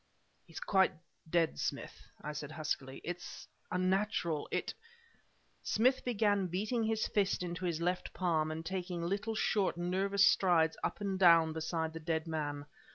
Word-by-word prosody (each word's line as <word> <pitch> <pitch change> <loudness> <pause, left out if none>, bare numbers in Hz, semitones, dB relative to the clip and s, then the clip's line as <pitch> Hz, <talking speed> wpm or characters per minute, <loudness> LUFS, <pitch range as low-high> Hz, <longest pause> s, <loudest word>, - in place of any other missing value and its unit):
"He's 165 - -8
quite 190 -1 +3 0.4
dead, 165 - +1
Smith," - - -4 0.2
I 150 - -4
said 150 -1 -5
huskily. 140 -4 -3
"It's 175 +1 -6 0.2
unnatural 185 -4 0
it - - -1 0.5
" - - -39
Smith 255 +4 +3
began 205 -5 +1
beating 215 +7 -1
his 220 0 0
fist 200 -3 +1
into 175 +1 -4
his 170 -2 -1
left 180 +1 -1
palm 160 -4 0
and 160 +1 -5
taking 180 -1 -3
little, 200 +5 -2
short, 200 -4 +1
nervous 190 +3 +2
strides 165 -5 +4
up - - -2
and 195 -2 -2
down 165 -3 +6
beside 160 0 -2
the 165 - -6
dead 160 0 -1
man. 145 -3 -3
175 Hz, 155 wpm, -33 LUFS, 160-195 Hz, 0.5 s, down